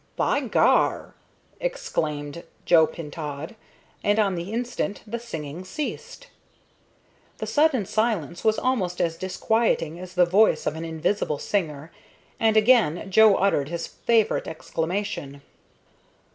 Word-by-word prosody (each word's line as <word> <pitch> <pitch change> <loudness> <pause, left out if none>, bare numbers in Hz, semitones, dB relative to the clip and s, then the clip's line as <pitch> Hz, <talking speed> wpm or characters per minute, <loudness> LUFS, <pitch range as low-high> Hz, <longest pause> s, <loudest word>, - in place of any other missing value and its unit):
"By - - +1
gar!" - - +2 0.5
exclaimed 155 - -3 0.2
Joe 160 -2 +6
Pintaud, 150 +3 -7 0.5
and 205 +1 +2
on 205 -3 +2
the 175 +3 -5
instant 235 -3 -3
the 235 +2 -4
singing 165 -7 -7
ceased. 470 - -6 1.1
The - - -4
sudden 290 -8 +2
silence 205 -7 -1
was 220 -1 +3
almost 195 -9 -1
as 165 -1 0
disquieting 185 -2 0
as 185 0 -10
the 180 -1 +5
voice 200 +5 +3
of 150 - -1
an 160 +1 -5
invisible 160 0 -1
singer, 155 -4 -3 0.5
and 220 -1 +3
again 215 -6 +3
Joe 215 0 +7
uttered 150 -8 +1
his 170 0 -3
favorite 225 -2 +1
exclamation. 160 -3 -4
185 Hz, 120 wpm, -24 LUFS, 160-220 Hz, 1.1 s, Joe